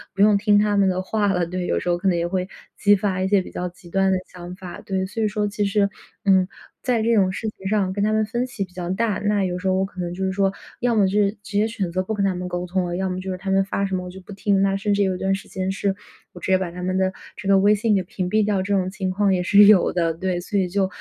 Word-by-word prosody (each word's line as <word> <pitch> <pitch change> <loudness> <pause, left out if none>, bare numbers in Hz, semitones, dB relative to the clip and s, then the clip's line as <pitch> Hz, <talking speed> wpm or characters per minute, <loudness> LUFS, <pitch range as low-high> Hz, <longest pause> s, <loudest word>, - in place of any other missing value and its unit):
不 195 - 0
用 205 0 +6
听 205 0 +3
他 205 -1 +2
们 200 -1 +4
的 185 0 -1
话 205 +2 0
了， 180 -2 +1
对， 180 +1 -3
有 - - +1
时 180 - -2
候 175 - +2
可 180 - -2
能 185 - +3
也 170 - 0
会 185 0 -2 0.3
激 205 0 +5
发 190 -2 -1
一 190 - +1
些 200 0 +3
比 - - -10
较 180 - -3
极 180 0 -17
端 195 +2 +2
的 - - +2
想 180 0 -9
法， 185 -1 -9
对。 190 -1 -2
所 205 +4 -5
以 - - +3
说 210 0 -1
其 205 0 -1
实， 200 0 +2 0.4
嗯， 190 -2 +4 0.4
在 245 -4 +1
这 230 +1 +2
种 190 -3 +3
事 220 +3 -3
情 190 -2 -8
上 195 -2 +1
跟 200 +1 -1
他 215 - +2
们 215 0 +2
分 240 +3 -2
歧 245 -5 -4
比 180 - -24
较 175 -1 -5
大。 210 +2 0
那 205 -1 +1
有 180 -1 -2
时 190 - -3
候 190 - +3
我 190 +1 +1
可 190 -1 -11
能 175 0 -3
就 190 +2 -4
是 190 - 0
说， 195 0 +2 0.3
要 245 -1 +2
么 205 -3 +4
就 - - -2
是 200 -1 +2
直 205 - -4
接 215 +1 +3
选 200 -6 -3
择 185 +2 -1
不 220 - -3
跟 205 -2 -1
他 190 -2 0
们 180 0 -4
沟 175 0 -3
通 185 0 0
了， 175 0 -3
要 190 0 -1
么 185 0 -3
就 190 0 -4
是 185 - -4
他 190 +1 -6
们 195 0 +3
发 200 0 -2
什 195 -1 -2
么 180 - -3
我 - - -7
就 190 - -10
不 185 - -13
听， 200 0 +1
那 195 0 +2
甚 205 +1 0
至 200 - +1
有 190 -1 0
一 - - -4
段 195 +1 0
时 195 - -9
间 190 0 -3
是 195 0 -1 0.4
我 - - -10
直 - - -2
接 185 - +6
把 185 -2 -3
他 180 +1 -7
们 185 +1 -1
的 190 0 +1 0.3
这 195 - -7
个 195 0 +5
微 200 +2 +5
信 210 0 +2
给 190 - +1
屏 180 0 -4
蔽 215 +2 +3
掉， 205 -2 +1
这 200 +2 -1
种 185 -1 0
情 190 -1 -3
况 195 +1 +2
也 180 - +1
是 200 +3 +6
有 205 -3 +6
的。 170 -2 +1
对， 180 +1 -2
所 200 +3 -1
以 185 - +1
就 190 +1 0
190 Hz, 350 characters per minute, -22 LUFS, 185-205 Hz, 0.4 s, 用